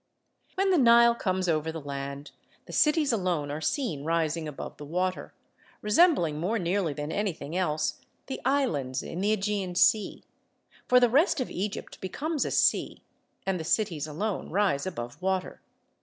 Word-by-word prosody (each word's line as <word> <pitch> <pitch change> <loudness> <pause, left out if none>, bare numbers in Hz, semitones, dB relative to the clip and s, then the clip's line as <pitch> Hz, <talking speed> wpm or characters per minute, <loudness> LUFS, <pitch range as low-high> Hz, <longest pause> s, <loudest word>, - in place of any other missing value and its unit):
When 390 0 +2
the 360 - +4
Nile 235 -1 +6
comes 185 -5 -1
over 160 -1 0
the 160 - -6
land, 140 0 -6 0.3
the - - -11
cities 300 -2 +3
alone 175 -8 -1
are 150 +2 -4
seen 210 - -1
rising 165 0 0
above 150 - -7
the - - -9
water, 180 +5 -2 0.5
resembling 210 - +3
more 195 +8 0
nearly 180 -2 0
than 150 +2 -5
anything 180 -6 -3
else 155 -4 -1 0.2
the 265 - -6
islands 155 - 0
in 180 - -5
the 205 +2 +2
Egean 195 -3 -2
Sea; 210 +2 +3 0.6
for 250 - +6
the 245 - +5
rest 280 - +3
of 255 - -3
Egypt 200 +2 -5
becomes 295 - -2
a - - -1
sea - - +1 0.4
and 190 -2 -1
the - - -4
cities 160 -4 0
alone 185 +7 -3
rise 185 -5 +1
above 120 -6 -6
water. 190 0 -2
185 Hz, 160 wpm, -28 LUFS, 155-225 Hz, 0.6 s, Nile